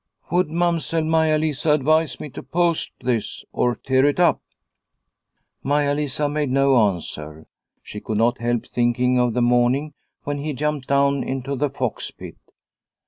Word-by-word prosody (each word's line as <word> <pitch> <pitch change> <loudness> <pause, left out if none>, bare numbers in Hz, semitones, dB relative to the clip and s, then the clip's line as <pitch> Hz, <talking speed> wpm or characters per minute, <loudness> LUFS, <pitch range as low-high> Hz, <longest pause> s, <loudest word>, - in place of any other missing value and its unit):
" - - -30
Would 175 -1 +2
Mamsell 165 -1 0
Maia 160 -1 +2
Lisa 155 0 +1
advise 155 +1 +1
me 150 - -6
to - - -8
post 170 -1 0
this 120 -4 -2
or 120 -1 +1
to - - -33
tear 130 0 +2
it 145 +4 +1
up? 175 - +3 0.6
" - - -52
Maia 145 +1 +1
Lisa 145 0 -1
made 145 -1 -1
no 135 +1 +3
answer. 80 -4 -7 0.4
She 105 - -8
could 110 - -3
not 120 +2 +2
help 120 0 -1
thinking 125 +1 +1
of 120 -2 +1
the 125 - +2
morning 125 +5 +2 0.3
when 145 0 -3
he 150 +1 -3
jumped 150 0 -2
down 140 0 +2
into 135 +1 -3
the 145 +2 0
fox 130 -4 -3
pit. - - -11
140 Hz, 170 wpm, -22 LUFS, 125-150 Hz, 0.6 s, up